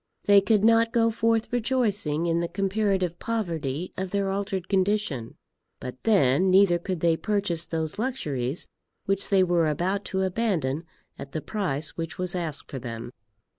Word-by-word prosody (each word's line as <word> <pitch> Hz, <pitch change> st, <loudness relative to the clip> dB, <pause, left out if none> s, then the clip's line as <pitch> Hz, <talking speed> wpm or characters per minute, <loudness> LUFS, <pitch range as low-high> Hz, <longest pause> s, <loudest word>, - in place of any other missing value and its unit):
They 200 Hz, -1 st, +6 dB
could 210 Hz, 0 st, +2 dB
not 230 Hz, 0 st, +4 dB
go 230 Hz, -1 st, +3 dB
forth 225 Hz, +1 st, 0 dB
rejoicing 215 Hz, -, +1 dB
in 170 Hz, 0 st, +1 dB
the 170 Hz, -, -1 dB
comparative 190 Hz, -1 st, 0 dB
poverty 170 Hz, -8 st, -3 dB
of 190 Hz, 0 st, -3 dB
their 195 Hz, 0 st, 0 dB
altered 195 Hz, -2 st, -3 dB
condition. 190 Hz, -, 0 dB, 0.4 s
But 125 Hz, 0 st, -8 dB
then, 190 Hz, -, +4 dB
neither 185 Hz, -2 st, +5 dB
could 180 Hz, -1 st, -4 dB
they 170 Hz, -1 st, +3 dB
purchase 195 Hz, -3 st, -1 dB
those 160 Hz, +3 st, -3 dB
luxuries 150 Hz, -, -2 dB, 0.4 s
which 195 Hz, 0 st, 0 dB
they 195 Hz, -2 st, +5 dB
were 175 Hz, -3 st, +2 dB
about 185 Hz, +7 st, -1 dB
to 190 Hz, -1 st, -1 dB
abandon 175 Hz, -, -1 dB, 0.3 s
at 140 Hz, -, -8 dB
the 155 Hz, -, -2 dB
price 160 Hz, -8 st, -2 dB
which 165 Hz, 0 st, -4 dB
was 180 Hz, -1 st, -2 dB
asked 165 Hz, -5 st, -4 dB
for 135 Hz, -, -4 dB
them. 120 Hz, -1 st, -6 dB
185 Hz, 160 wpm, -26 LUFS, 160-205 Hz, 0.4 s, They